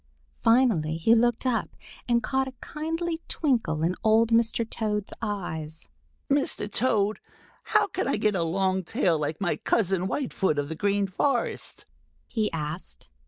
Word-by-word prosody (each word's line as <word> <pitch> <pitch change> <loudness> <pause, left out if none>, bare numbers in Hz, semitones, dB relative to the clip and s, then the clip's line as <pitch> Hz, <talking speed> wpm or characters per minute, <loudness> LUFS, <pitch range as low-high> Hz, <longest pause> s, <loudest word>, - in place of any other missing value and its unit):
Finally 220 -11 +3
he 195 +8 +4
looked 240 +1 +2
up 250 -3 -1 0.3
and 235 -1 +3
caught 265 +3 0
a 260 - -7
kindly 325 +2 -3
twinkle 225 - 0
in 170 +2 +2
old 225 +1 +4
Mr. 230 0 +2
Toad's 210 -3 -2
eyes. 160 -7 -5 0.4
"Mr. 275 -6 +1
Toad, 215 -2 +2 0.5
how - - +3
can - - -3
I - - +1
get 210 -1 +2
a 185 - 0
long 190 +3 0
tail 165 -1 +1
like 150 +1 -2
my 195 -3 0
cousin 190 -4 +1
Whitefoot 190 - -1
of 145 0 -1
the 160 - -4
Green 200 +3 +1
Forest?" 240 +6 -1 0.4
he 220 -3 -1
asked. 150 - -6
210 Hz, 150 wpm, -26 LUFS, 170-235 Hz, 0.5 s, he